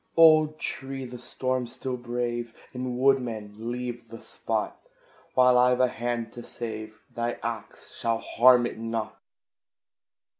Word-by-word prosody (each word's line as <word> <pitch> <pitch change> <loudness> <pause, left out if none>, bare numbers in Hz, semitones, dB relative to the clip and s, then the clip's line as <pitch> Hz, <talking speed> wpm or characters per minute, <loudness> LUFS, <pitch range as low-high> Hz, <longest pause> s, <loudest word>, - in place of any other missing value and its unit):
Old 155 -2 +7
tree! 135 -2 -4
the 125 0 -8
storm 130 +1 -2
still 125 +2 -4
brave! 120 -1 -3 0.2
And, 125 -1 -3
woodman, 125 -6 +1 0.2
leave 120 -1 -5
the 115 0 -9
spot; - - -3 0.5
While 125 -1 +6
I've 125 0 +4
a 130 -1 +4
hand 120 -2 -3
to 120 - -8
save, 110 -2 -7
thy 120 0 -1
axe 115 -1 -6
shall 115 -1 +1
harm 120 +1 +5
it 115 - -5
not. 115 -1 -4
120 Hz, 135 wpm, -27 LUFS, 115-125 Hz, 0.5 s, Old